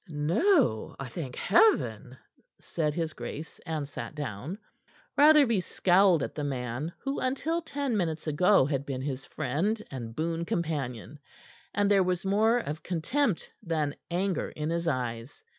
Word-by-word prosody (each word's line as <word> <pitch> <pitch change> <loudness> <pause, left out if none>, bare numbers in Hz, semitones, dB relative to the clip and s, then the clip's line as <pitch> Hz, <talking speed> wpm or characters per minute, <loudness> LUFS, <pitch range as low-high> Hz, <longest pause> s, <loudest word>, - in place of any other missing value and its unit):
"No, 160 - +2
I 135 -2 -5
thank 130 -1 -6
Heaven!" 425 - +2 0.4
said 150 -3 -2
his 165 -2 -2
grace, 155 +1 -7
and 155 -3 -2
sat 145 - -7
down. 145 - -5 0.6
Rotherby 290 -7 +6
scowled 180 -2 +3
at - - -4
the 150 - -4
man 130 +2 -3
who 275 0 -3
until 285 +6 -1
ten 285 -6 -2
minutes 160 -5 -1
ago 165 +2 +4
had 140 -1 -1
been 135 -2 -4
his 135 -2 -4
friend 160 - -1
and 115 -4 -6
boon 165 +2 -1
companion, 150 -6 -3 0.5
and 205 0 +1
there 200 -1 +5
was 185 0 0
more 215 +4 +3
of 155 -9 -4
contempt 190 - -1
than 155 -6 -1 0.2
anger 185 +2 -1
in 155 +1 -3
his 170 0 -1
eyes. 125 -3 -3
165 Hz, 145 wpm, -29 LUFS, 140-200 Hz, 0.6 s, Rotherby